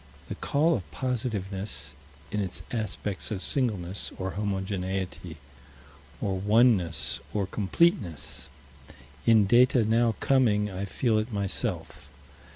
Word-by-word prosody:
The - - -2
call 155 +4 +3
of 90 -9 -6
positiveness, 100 - -3 0.4
in 105 - -1
its 95 -3 -3
aspects 105 -3 -2
of 100 -4 -4
singleness, 100 -8 -1
or 95 0 -3
homogeneity, 95 -4 -3 0.8
or 95 -3 -1
oneness, 105 -5 +3 0.2
or 100 -2 +1
completeness. 100 - 0 0.8
In 110 -3 +6
data 120 +2 +5
now 115 0 +3
coming, 105 -6 +3
I 95 +2 -3
feel 110 +2 +1
it 110 +3 -3
myself. 100 -8 -3
105 Hz, 110 wpm, -28 LUFS, 95-115 Hz, 0.8 s, In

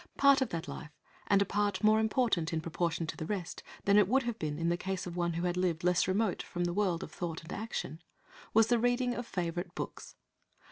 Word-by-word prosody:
Part 280 -1 +6
of 265 - +1
that 165 -1 -4
life, 155 - -7 0.4
and 200 -1 +5
a - - -7
part 205 -1 0
more 215 +1 +6
important, 220 -7 +1
in 165 - 0
proportion 165 +1 -1
to - - -5
the 155 - -5
rest, 180 -4 -4 0.2
than 200 +1 +6
it 200 - +4
would 265 +5 +3
have 235 -1 -3
been 150 -2 -2
in 165 +1 0
the 170 - +2
case 190 +1 -3
of 175 -1 -6
one 170 -1 0
who 170 +1 -2
had 175 0 0
lived 180 -2 0
less 180 0 +3
remote 195 +1 +1
from 175 - -4
the 175 0 0
world 185 -4 0
of - - -8
thought 165 -2 -5
and 160 - -8
action, 190 -7 -4 0.5
was 225 +1 +6
the 235 +1 +2
reading 245 +1 +1
of 240 0 -5
favourite 175 0 -3
books. - - -6
180 Hz, 235 wpm, -32 LUFS, 170-215 Hz, 0.5 s, Part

